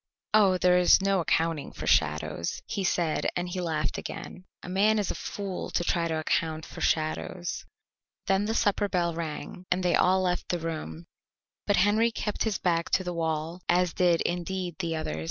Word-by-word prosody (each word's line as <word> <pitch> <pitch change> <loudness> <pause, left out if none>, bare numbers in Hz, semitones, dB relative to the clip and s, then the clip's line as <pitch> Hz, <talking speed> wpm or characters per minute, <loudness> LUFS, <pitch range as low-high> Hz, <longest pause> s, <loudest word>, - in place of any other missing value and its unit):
"Oh, 200 -4 +5
there 180 0 +4
is 180 - +6
no 195 0 +2
accounting 165 -3 0
for - - -7
shadows," 75 +2 0
he 200 - -3
said, 170 -4 +1
and 175 0 -1
he 180 +1 -3
laughed 160 -3 -1
again. 180 - -8 0.2
"A - - -8
man 205 +4 +3
is 205 -3 0
a - - -1
fool 195 -3 -5
to - - 0
try 170 -1 +1
to 160 -1 -1
account 160 0 -1
for - - -10
shadows." 160 +2 -1 0.6
Then 195 +1 +2
the 220 +1 -1
supper 205 -2 +1
bell 175 -3 0
rang, 165 +2 -6
and 180 +1 +1
they 175 -1 +2
all 185 +1 +3
left 180 -1 -1
the 175 - +1
room, 155 - -5 0.6
but 205 - +4
Henry 210 +5 +4
kept 215 -2 -2
his 215 -5 0
back 170 -1 0
to 185 - +2
the 180 -1 -3
wall, 165 +1 -2
as 180 -1 +3
did, 175 -2 +3
indeed, 175 0 -2
the 165 -3 -1
others. 155 - -3
175 Hz, 190 wpm, -28 LUFS, 165-190 Hz, 0.6 s, is